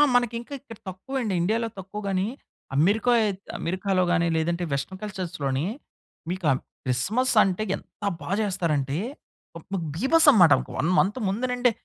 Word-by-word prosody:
మనకి 240 -1 +2
ఇంకా 240 +4 -10
ఇక్కడ 230 -5 -12
తక్కువండి. 225 +3 -3
ఇండియాలో 225 +5 +1
తక్కువగానీ, 195 0 -2 0.5
అమెరికా 205 +10 +3
అయిత్ 200 -2 -1 0.2
అమెరికాలో 185 +1 0
గాని 170 -1 +2
లేదంటే 170 +2 0
వెస్టర్న్ 185 +8 -3
కల్చర్స్‌ 190 -5 -5
లోని 135 +3 0 0.6
మీకు 185 -2 -3
ఆహ్, 130 - +1 0.3
క్రిస్మస్, 200 - +1
అంటే 190 +3 0
ఎంత - - -14 0.2
బా - - -6
చేస్తారంటే! 155 -8 0 0.6
ఒక 160 - -12 0.3
బీభత్సమన్నమాట. 260 - +6 0.3
1 160 - +1
మంత్ 210 +7 +1
ముందు 225 +6 -1
నుండే, 245 -1 +3
190 Hz, 135 wpm, -25 LUFS, 170-230 Hz, 0.6 s, బీభత్సమన్నమాట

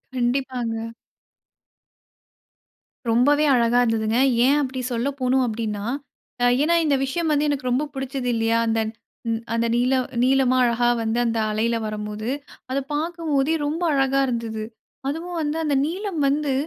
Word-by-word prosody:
கண்டிப்பாங்க. 240 -3 -1 2.2
ரொம்பவே 285 +6 +4
அழகா 240 0 +3
இருந்ததுங்க. 225 -1 +1 0.3
ஏன் 280 +3 +4
அப்பிடி 260 -2 -3
சொல்ல 235 +3 -1
போணும் 260 +1 +2
அப்டின்னா, 215 -2 -3 0.6
அ - - +4 0.2
ஏன்னா 335 +3 +3
இந்த 290 -2 +3
விஷயம் 320 +5 -1
வந்து 300 0 +2
எனக்கு 275 -3 -1
ரொம்ப 255 +4 +2
புடிச்சது 265 -1 -3
இல்லியா? 225 0 +2
அந்த 225 0 +1 0.7
அந்த 230 0 +1
நீல 250 +2 +2 0.3
நீலமா 260 0 +3
அழகா 240 0 +2
வந்து 225 +1 -1
அந்த 230 -1 0
அலையில 225 +2 0
வரம்போது, 215 +1 -4 0.4
அதை 270 - +1
பார்க்கும் 330 +1 -3
போதே 280 +3 +2
ரொம்ப 310 +4 -2
அழகா 270 0 +2
இருந்துது. 230 -3 -3 0.4
அதுவும் 335 +5 -4
வந்து 300 +1 -1
அந்த 295 -2 +1
நீலம் 370 +3 -4
வந்து 285 0 +1
255 Hz, 135 wpm, -23 LUFS, 230-290 Hz, 2.2 s, ரொம்பவே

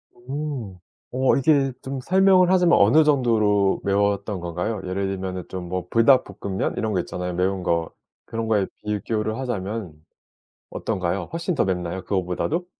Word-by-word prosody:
음. 130 -5 -5 0.3
어 130 +1 +2
이게 140 -1 +3
좀 135 0 -5
설명을 185 +2 +4
하자면 180 -2 +5
어느 115 +11 +6
정도로 110 -8 +2
매웠던 100 0 0
건가요? 90 +5 -3
예를 95 +1 -2
들면은 95 -1 -4
좀 90 -2 -6
뭐 90 -1 -3
불닭볶음면 115 -5 +2
이런 110 - -1
거 95 - +1
있잖아요 90 +1 -5
매운 95 +1 0
거. 85 -2 0 0.3
그런 115 0 -4
거에 105 -3 +2 0.2
비교를 105 +1 -2
하자면 105 -7 -4 0.8
어떤가요? 95 -3 -2
훨씬 170 +1 -2
더 - - +2
맵나요 90 -1 -2
그거보다도? 95 - -1
105 Hz, 325 characters per minute, -23 LUFS, 95-130 Hz, 0.8 s, 어느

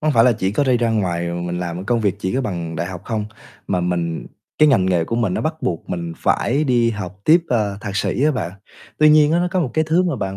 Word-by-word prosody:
Không 155 -1 +1
phải 115 -1 +5
là 125 - +5
chỉ 95 -3 -1
có 140 +7 +1
đi 130 -2 +3
ra 115 -1 +1
ngoài 85 -5 -1
mình 85 0 -3
làm 90 +1 -4
công 120 +2 +1
việc 100 -3 0
chỉ 95 -2 -2
có 135 - +1
bằng 85 -8 -4
đại 85 - -2
học 90 -1 -7
không, 110 -2 -2 0.4
mà 90 - 0
mình 85 -2 -2 0.3
cái 155 - +6
ngành 110 -10 +3
nghề 90 -3 +2
của 115 - -3
mình 110 -6 0
nó - - -1
bắt 155 +1 -1
buộc 85 -3 -3
mình 85 -2 -3
phải 140 +6 +1
đi 120 -4 +2
học 100 -3 -6
tiếp, 165 +3 +6
à, 105 -5 0
thạc 100 -4 -5
sĩ 125 - 0
á 155 - +4
bạn. 95 - -3 0.5
Tuy 155 0 +6
nhiên 150 0 +5
á, 170 - +3
nó 175 0 +1
có 185 -1 0
một 135 -7 -1
cái 160 0 +2
thứ 165 +4 +2
mà 175 - -1
bạn 95 0 -4
105 Hz, 280 wpm, -20 LUFS, 90-135 Hz, 0.5 s, cái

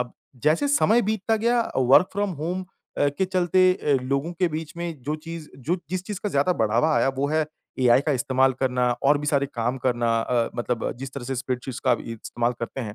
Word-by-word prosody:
अब 125 -1 -4 0.3
जैसे 155 - +2
समय 240 -5 +4
बीतता 220 +1 0
गया 235 +2 +2 0.2
वर्क 130 +8 +5
फ्रॉम 205 0 -1
होम 180 +3 -2 0.3
अ, 145 - +3
के 145 +7 -1
चलते 185 0 +3
अ, 150 -5 -1
लोगों 140 +6 -1
के 180 +1 +1
बीच 155 0 -5
में 170 -5 -5
जो 150 +4 -2
चीज़ 165 -2 -7
जो 155 +8 -1
जिस 185 -1 -2
चीज़ 205 -1 -5
का 210 - 0
ज़्यादा 145 +2 +2
बढ़ावा 115 +4 +2
आया - - +3
वो 140 +1 0
है 155 0 +1 0.3
एआई 125 0 +5
का 150 - +3
इस्तेमाल 130 0 +2
करना 125 -2 +1
और 145 +1 +5
भी 150 - -5
सारे 140 -1 +2
काम 120 +2 -1
करना 120 -2 0
अ, 120 0 0
मतलब 120 -1 -2
जिस 135 0 -7
तरह 140 -3 -6
से 135 +2 -3
स्प्रेडशीट्स 125 0 -4
का 130 - +1
अभी 115 - -3
इस्तेमाल 120 +2 -2
करते 120 +3 -4
हैं। 105 -4 -5
140 Hz, 220 wpm, -24 LUFS, 125-180 Hz, 0.3 s, वर्क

